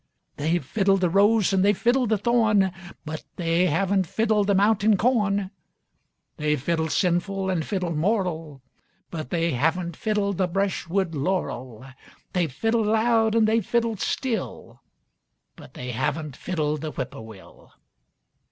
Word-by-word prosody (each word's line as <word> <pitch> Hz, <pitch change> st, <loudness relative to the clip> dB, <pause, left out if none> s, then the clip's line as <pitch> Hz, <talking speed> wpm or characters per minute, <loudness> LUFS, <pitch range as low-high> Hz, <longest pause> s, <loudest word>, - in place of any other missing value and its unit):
They've 160 Hz, 0 st, 0 dB
fiddled 195 Hz, +4 st, +1 dB
the 180 Hz, -2 st, +2 dB
rose, 205 Hz, +1 st, +3 dB
and 190 Hz, -1 st, +3 dB
they've 205 Hz, -1 st, +3 dB
fiddled 245 Hz, 0 st, +2 dB
the 220 Hz, -, +2 dB
thorn, 210 Hz, -3 st, +2 dB, 0.3 s
But 155 Hz, 0 st, -6 dB
they 170 Hz, +1 st, +1 dB
haven't 190 Hz, +3 st, +1 dB
fiddled 215 Hz, +1 st, +1 dB
the 200 Hz, -, +3 dB
mountain 205 Hz, +1 st, +3 dB
corn. 205 Hz, -4 st, +1 dB, 0.9 s
They've 150 Hz, -1 st, 0 dB
fiddled 160 Hz, +3 st, -1 dB
sinful 190 Hz, +2 st, 0 dB
an' 175 Hz, -3 st, 0 dB
fiddled 180 Hz, -2 st, -2 dB
moral, 165 Hz, -, -1 dB, 0.5 s
But 155 Hz, -6 st, -5 dB
they 170 Hz, +1 st, 0 dB
haven't 165 Hz, +6 st, 0 dB
fiddled 205 Hz, -2 st, -1 dB
the 185 Hz, -, +2 dB
breshwood 190 Hz, -1 st, -1 dB
laurel. 130 Hz, -, -3 dB, 0.5 s
They've 175 Hz, -5 st, 0 dB
fiddled 225 Hz, -, 0 dB
loud, 225 Hz, 0 st, +2 dB
and 225 Hz, -1 st, +4 dB
they've 225 Hz, 0 st, +2 dB
fiddled 230 Hz, -1 st, 0 dB
still, 245 Hz, +1 st, -3 dB, 0.7 s
But -, -, -15 dB
they 125 Hz, 0 st, -5 dB
haven't 135 Hz, +4 st, -2 dB
fiddled 155 Hz, -4 st, -2 dB
the 155 Hz, -, -3 dB
whippoorwill. 110 Hz, -7 st, -9 dB
190 Hz, 135 wpm, -24 LUFS, 160-210 Hz, 0.9 s, and